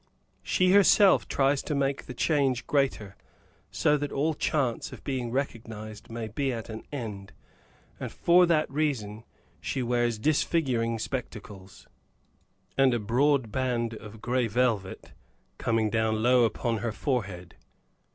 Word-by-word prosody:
She 185 Hz, 0 st, +2 dB
herself 200 Hz, 0 st, +5 dB
tries 135 Hz, 0 st, +1 dB
to 150 Hz, -, -3 dB
make 140 Hz, 0 st, -1 dB
the 125 Hz, -, -7 dB
change 135 Hz, -4 st, +1 dB
greater, 130 Hz, -8 st, 0 dB, 0.5 s
so 150 Hz, 0 st, +2 dB
that 145 Hz, 0 st, -4 dB
all 155 Hz, +3 st, 0 dB
chance 140 Hz, -5 st, -1 dB
of -, -, -11 dB
being 130 Hz, -3 st, -3 dB
recognized 110 Hz, -4 st, -5 dB
may 115 Hz, -1 st, -5 dB
be 135 Hz, +5 st, -2 dB
at 115 Hz, -2 st, -6 dB
an 110 Hz, 0 st, -6 dB
end, 105 Hz, -8 st, -6 dB, 0.7 s
and -, -, -5 dB
for 175 Hz, +1 st, +4 dB
that 155 Hz, -2 st, +2 dB
reason 115 Hz, -8 st, -2 dB, 0.3 s
she 130 Hz, -, -3 dB
wears 120 Hz, -1 st, 0 dB
disfiguring 125 Hz, -3 st, +1 dB
spectacles, 105 Hz, -5 st, -7 dB, 0.9 s
and 135 Hz, -2 st, +4 dB
a -, -, 0 dB
broad 125 Hz, +2 st, +1 dB
band 120 Hz, -2 st, -1 dB
of 110 Hz, 0 st, -10 dB
gray 125 Hz, -1 st, +1 dB
velvet, 110 Hz, -4 st, -1 dB, 0.5 s
coming 115 Hz, -2 st, +1 dB
down 110 Hz, 0 st, 0 dB
low 125 Hz, 0 st, +5 dB
upon 115 Hz, 0 st, -1 dB
her 115 Hz, 0 st, -2 dB
forehead. 100 Hz, -, -3 dB
120 Hz, 135 wpm, -27 LUFS, 110-140 Hz, 0.9 s, herself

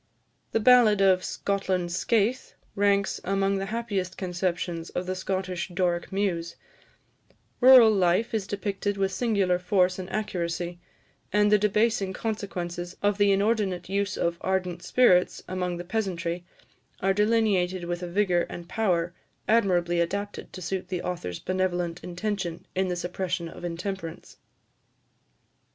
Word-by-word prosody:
" -, -, -44 dB
The 225 Hz, -, +3 dB
ballad 230 Hz, -3 st, +6 dB
of 190 Hz, -2 st, +4 dB
"Scotland's 185 Hz, -3 st, -1 dB
Skaith" 230 Hz, +5 st, 0 dB, 0.2 s
ranks 200 Hz, 0 st, +1 dB
among 195 Hz, +1 st, +1 dB
the 195 Hz, -, -3 dB
happiest 200 Hz, -4 st, -3 dB
conceptions 175 Hz, -2 st, -2 dB
of 180 Hz, -, -3 dB
the 185 Hz, -, -2 dB
Scottish 185 Hz, -1 st, -3 dB
Doric 175 Hz, -1 st, -1 dB
muse; 175 Hz, -4 st, -1 dB, 1.0 s
rural 250 Hz, -3 st, +9 dB
life 195 Hz, +4 st, +2 dB
is 210 Hz, -3 st, -1 dB
depicted 205 Hz, 0 st, -2 dB
with 195 Hz, -1 st, +1 dB
singular 190 Hz, -4 st, +1 dB
force 185 Hz, 0 st, +2 dB
and 185 Hz, 0 st, -6 dB
accuracy, 175 Hz, -4 st, -3 dB, 0.5 s
and 210 Hz, 0 st, +3 dB
the 210 Hz, -, +6 dB
debasing 210 Hz, -1 st, +1 dB
consequences 180 Hz, -5 st, -4 dB
of 205 Hz, 0 st, +2 dB
the 205 Hz, 0 st, +5 dB
inordinate 195 Hz, -3 st, 0 dB
use 200 Hz, 0 st, -1 dB
of 170 Hz, 0 st, -1 dB
ardent 185 Hz, -2 st, -1 dB
spirits 180 Hz, -2 st, +3 dB
among 180 Hz, -1 st, -2 dB
the 175 Hz, -, -5 dB
peasantry, 175 Hz, -4 st, -2 dB, 0.5 s
are 195 Hz, +1 st, +2 dB
delineated 205 Hz, -4 st, +2 dB
with 175 Hz, +1 st, -3 dB
a 180 Hz, -, -4 dB
vigour 180 Hz, -2 st, +1 dB
and 170 Hz, 0 st, -8 dB
power, 175 Hz, -6 st, 0 dB, 0.3 s
admirably 175 Hz, -6 st, +2 dB
adapted 200 Hz, +4 st, -3 dB
to 185 Hz, -, -7 dB
suit 185 Hz, +3 st, -3 dB
the 180 Hz, -2 st, -3 dB
author's 170 Hz, -, -4 dB
benevolent 180 Hz, -2 st, -2 dB
intention 180 Hz, -1 st, -4 dB
in 190 Hz, 0 st, 0 dB
the 180 Hz, -, -1 dB
suppression 175 Hz, 0 st, -3 dB
of 165 Hz, -, -11 dB
intemperance. 175 Hz, 0 st, -5 dB
190 Hz, 140 wpm, -26 LUFS, 175-205 Hz, 1.0 s, rural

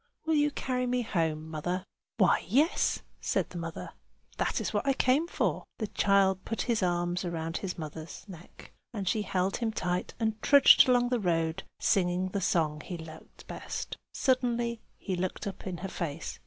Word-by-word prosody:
"Will 320 Hz, -, +1 dB
you 295 Hz, -1 st, +4 dB
carry 250 Hz, -3 st, -2 dB
me 250 Hz, 0 st, +1 dB
home, 160 Hz, -7 st, -1 dB
mother?" 175 Hz, +4 st, -3 dB, 0.3 s
"Why, 190 Hz, -6 st, +4 dB
yes!" 280 Hz, -, +2 dB, 0.2 s
said -, -, -1 dB
the 175 Hz, -, -5 dB
mother. 165 Hz, 0 st, -6 dB, 0.5 s
"That -, -, 0 dB
is -, -, -3 dB
what -, -, -1 dB
I 275 Hz, -, +5 dB
came 270 Hz, +5 st, +2 dB
for." -, -, -1 dB
The 220 Hz, -, -2 dB
child 195 Hz, -2 st, +2 dB
put 225 Hz, -, -2 dB
his 235 Hz, -4 st, 0 dB
arms 175 Hz, 0 st, 0 dB
round 165 Hz, -2 st, -3 dB
his 190 Hz, -3 st, -4 dB
mother's 160 Hz, +3 st, -8 dB
neck, 180 Hz, -3 st, -13 dB, 0.2 s
and 195 Hz, -3 st, -3 dB
she 215 Hz, -, +2 dB
held 190 Hz, -1 st, 0 dB
him 230 Hz, -2 st, -1 dB
tight 180 Hz, -4 st, -2 dB
and 220 Hz, -1 st, -1 dB
trudged 280 Hz, -2 st, +7 dB
along 245 Hz, -1 st, +4 dB
the 245 Hz, -1 st, +1 dB
road, 165 Hz, -4 st, 0 dB, 0.2 s
singing 185 Hz, -2 st, +2 dB
the 195 Hz, +1 st, -2 dB
song 155 Hz, -4 st, +1 dB
he 180 Hz, -, -5 dB
liked 160 Hz, -1 st, -12 dB
best. -, -, -5 dB, 0.2 s
Suddenly 240 Hz, -3 st, 0 dB, 0.2 s
he 190 Hz, -, -3 dB
looked 185 Hz, +1 st, -3 dB
up 200 Hz, -1 st, -6 dB
in 180 Hz, -2 st, -3 dB
her -, -, -1 dB
face. 165 Hz, -4 st, -5 dB
190 Hz, 180 wpm, -30 LUFS, 170-235 Hz, 0.5 s, trudged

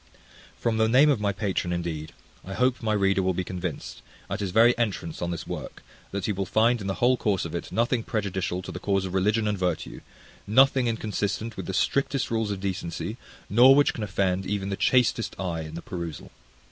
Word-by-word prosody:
From 115 Hz, -1 st, 0 dB
the 110 Hz, 0 st, +3 dB
name 140 Hz, +5 st, +6 dB
of 135 Hz, -, +1 dB
my 100 Hz, -1 st, +1 dB
patron, 95 Hz, -4 st, -2 dB
indeed, 85 Hz, -3 st, -3 dB, 0.3 s
I 95 Hz, +1 st, -7 dB
hope 125 Hz, 0 st, +1 dB
my 110 Hz, -2 st, 0 dB
reader 100 Hz, -2 st, +2 dB
will 95 Hz, -1 st, 0 dB
be 95 Hz, -, -1 dB
convinced, 90 Hz, -1 st, -5 dB, 0.3 s
at -, -, -2 dB
his 100 Hz, -2 st, -2 dB
very 115 Hz, +6 st, +5 dB
entrance 100 Hz, -8 st, -2 dB
on 85 Hz, -, -1 dB
this 85 Hz, -2 st, -4 dB
work, -, -, -7 dB, 0.3 s
that 100 Hz, -1 st, -3 dB
he -, -, 0 dB
will 95 Hz, -1 st, -2 dB
find 115 Hz, +1 st, +3 dB
in 100 Hz, -, -4 dB
the 95 Hz, -, -1 dB
whole 125 Hz, +1 st, +3 dB
course 100 Hz, -7 st, 0 dB
of 85 Hz, -, -6 dB
it 85 Hz, -, -5 dB
nothing 120 Hz, +1 st, +1 dB
prejudicial 95 Hz, -4 st, -2 dB
to 95 Hz, -, -7 dB
the 90 Hz, -, -6 dB
cause 100 Hz, -1 st, 0 dB
of 95 Hz, -, -5 dB
religion 105 Hz, +3 st, +2 dB
and 105 Hz, -2 st, -1 dB
virtue, 90 Hz, -3 st, -2 dB, 0.5 s
nothing 130 Hz, +3 st, +4 dB
inconsistent 110 Hz, 0 st, -2 dB
with 95 Hz, -, -6 dB
the 95 Hz, -, -3 dB
strictest 135 Hz, +5 st, 0 dB
rules 110 Hz, -2 st, 0 dB
of 100 Hz, -2 st, -3 dB
decency, 95 Hz, -3 st, -4 dB, 0.3 s
nor 125 Hz, +6 st, +7 dB
which 145 Hz, 0 st, +4 dB
can 115 Hz, -, -6 dB
offend 95 Hz, -1 st, 0 dB
even 100 Hz, -1 st, -2 dB
the 100 Hz, -, -1 dB
chastest 120 Hz, 0 st, +1 dB
eye 85 Hz, -4 st, -2 dB
in 80 Hz, 0 st, -8 dB
the 85 Hz, -, -7 dB
perusal. 85 Hz, -4 st, -6 dB
100 Hz, 210 wpm, -26 LUFS, 90-115 Hz, 0.5 s, nor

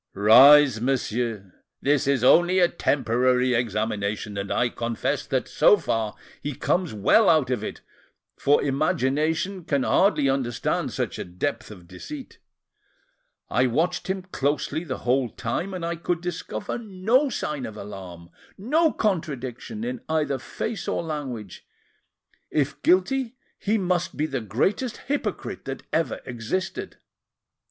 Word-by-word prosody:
"Rise, 130 Hz, +4 st, +7 dB
monsieur. 115 Hz, -6 st, -2 dB, 0.3 s
This 140 Hz, 0 st, +1 dB
is 140 Hz, -3 st, +2 dB
only 175 Hz, +7 st, +5 dB
a 180 Hz, -2 st, +6 dB
preliminary 125 Hz, -3 st, +1 dB
examination, 105 Hz, -2 st, -1 dB
and 100 Hz, 0 st, -4 dB
I 120 Hz, -, +2 dB
confess 115 Hz, -1 st, -2 dB
that, -, -, -1 dB
so -, -, +5 dB
far, 110 Hz, -2 st, -2 dB, 0.3 s
he 145 Hz, -1 st, -4 dB
comes 180 Hz, +4 st, 0 dB
well 110 Hz, -, +4 dB
out 155 Hz, -6 st, +3 dB
of 125 Hz, -, -1 dB
it, -, -, -6 dB, 0.5 s
for 145 Hz, +1 st, +3 dB
imagination 155 Hz, +5 st, 0 dB
can 140 Hz, -4 st, 0 dB
hardly 185 Hz, -5 st, +3 dB
understand 130 Hz, -4 st, -1 dB
such -, -, -3 dB
a -, -, -2 dB
depth 110 Hz, +7 st, -4 dB
of 90 Hz, -5 st, -12 dB
deceit. 285 Hz, -, -9 dB, 1.1 s
I 130 Hz, +1 st, +2 dB
watched 165 Hz, +9 st, 0 dB
him 190 Hz, 0 st, -2 dB
closely 150 Hz, -1 st, -1 dB
the 135 Hz, -6 st, -4 dB
whole 125 Hz, 0 st, +2 dB
time, 145 Hz, -, -3 dB
and 180 Hz, -3 st, -4 dB
I 170 Hz, 0 st, -2 dB
could 170 Hz, 0 st, -2 dB
discover 170 Hz, -, -4 dB
no 225 Hz, +6 st, +1 dB
sign 150 Hz, -, -3 dB
of 110 Hz, -, -9 dB
alarm, 90 Hz, -4 st, -9 dB, 0.3 s
no 310 Hz, -, +2 dB
contradiction, 165 Hz, -, -3 dB
in 245 Hz, 0 st, -4 dB
either 150 Hz, -4 st, 0 dB
face 215 Hz, -, -5 dB
or -, -, -1 dB
language; 135 Hz, -, -6 dB, 0.8 s
if 145 Hz, -1 st, -1 dB
guilty, 230 Hz, +9 st, +2 dB, 0.2 s
he 215 Hz, +2 st, +1 dB
must 180 Hz, -3 st, -1 dB
be 150 Hz, -, +1 dB
the 135 Hz, -5 st, -3 dB
greatest 190 Hz, -, -1 dB
hypocrite 290 Hz, +1 st, -3 dB
that -, -, -6 dB
ever 165 Hz, -, 0 dB
existed. 185 Hz, -, -4 dB
145 Hz, 135 wpm, -25 LUFS, 120-180 Hz, 1.1 s, Rise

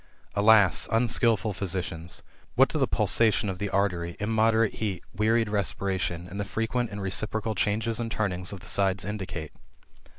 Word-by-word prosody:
Alas! 105 Hz, -2 st, +5 dB
unskilful 115 Hz, -2 st, +2 dB
physicians! 90 Hz, -3 st, -4 dB, 0.3 s
What -, -, +5 dB
do -, -, -1 dB
the -, -, +2 dB
pulsation 110 Hz, -2 st, +2 dB
of 95 Hz, -2 st, -5 dB
the 100 Hz, -, -2 dB
artery, 90 Hz, -4 st, -1 dB
immoderate 110 Hz, +1 st, +2 dB
heat, 100 Hz, -5 st, -3 dB
wearied 110 Hz, +3 st, +2 dB
respiration, 95 Hz, -4 st, -2 dB
and 100 Hz, +3 st, -7 dB
the -, -, 0 dB
frequent 115 Hz, +3 st, -2 dB
and 100 Hz, -1 st, -6 dB
reciprocal 110 Hz, +3 st, -1 dB
changes 110 Hz, +3 st, 0 dB
and 115 Hz, -1 st, -2 dB
turnings 90 Hz, -5 st, -1 dB
of 100 Hz, -3 st, -8 dB
the 100 Hz, -, -13 dB
side 100 Hz, -2 st, +1 dB
in 105 Hz, +1 st, -4 dB
dicate? 85 Hz, -5 st, -6 dB
100 Hz, 160 wpm, -27 LUFS, 95-110 Hz, 0.3 s, Alas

